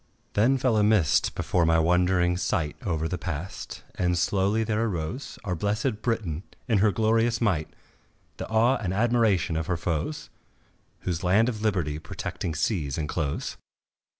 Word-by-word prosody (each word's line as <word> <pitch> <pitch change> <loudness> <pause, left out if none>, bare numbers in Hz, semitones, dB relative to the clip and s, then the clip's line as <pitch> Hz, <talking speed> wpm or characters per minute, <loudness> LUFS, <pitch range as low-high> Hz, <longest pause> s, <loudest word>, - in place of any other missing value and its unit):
Then 120 +6 +3
fell 125 -4 +2
a 105 - +4
mist 105 -9 +3
before 90 - +1
my 80 0 +4
wondering 90 +1 +3
sight 80 -4 -1
Over 80 -4 -1
the 90 +1 -3
past, 85 +1 -6
and 90 -1 0
slowly 100 +5 +1
there 110 0 0
arose 100 - -3
Our 90 -4 -2
blessèd 105 +5 -1
Britain 105 -10 -1 0.3
in 110 -5 +3
her 105 +1 +4
glorious 115 +1 +2
might, 90 -10 +1 0.7
The - - -6
awe 115 +4 +3
and 95 -5 -3
admiration 110 -7 +2
of 80 +1 -2
her 90 -2 0
foes, 85 - -3 0.7
Whose 90 0 -3
land 105 +7 +4
of 110 -4 -5
liberty 90 -9 0
protecting 80 0 -5
seas 80 - -1
enclose. 75 -1 -2
95 Hz, 150 wpm, -26 LUFS, 85-110 Hz, 0.7 s, a